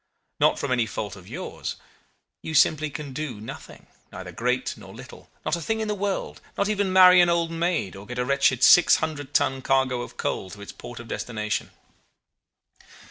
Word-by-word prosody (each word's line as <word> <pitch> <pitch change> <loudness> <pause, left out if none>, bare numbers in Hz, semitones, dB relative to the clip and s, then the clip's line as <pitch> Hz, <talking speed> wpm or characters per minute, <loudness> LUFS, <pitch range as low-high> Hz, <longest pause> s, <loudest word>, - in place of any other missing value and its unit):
Not - - +4
from 140 - -3
any 120 -3 +2
fault 105 -2 -5
of 95 -2 -14
yours. - - -6 0.7
You 160 - -5
simply 155 +1 +4
can 140 0 -7
do 130 -6 -5
nothing, 110 - -10 0.3
neither 90 -1 -8
great 125 +7 -1
nor - - -13
little - - -12 0.2
not - - +1
a 170 - -6
thing 220 +7 -1
in 220 - -2
the 210 - 0
world 200 -1 -3 0.2
not 200 - +1
even 205 -2 0
marry 180 -1 +8
an 175 - +4
old 170 -1 +1
maid, 165 - -1
or 100 +1 -11
get 125 - -6
a 125 - 0
wretched 135 -2 +2
600 155 -4 +5
ton 135 0 +2
cargo 130 -2 +1
of - - -9
coal 95 - -3
to 100 +2 -11
its 100 - -8
port 120 - -10
of 120 - -10
destination. 110 -2 -3
135 Hz, 190 wpm, -25 LUFS, 120-170 Hz, 0.7 s, marry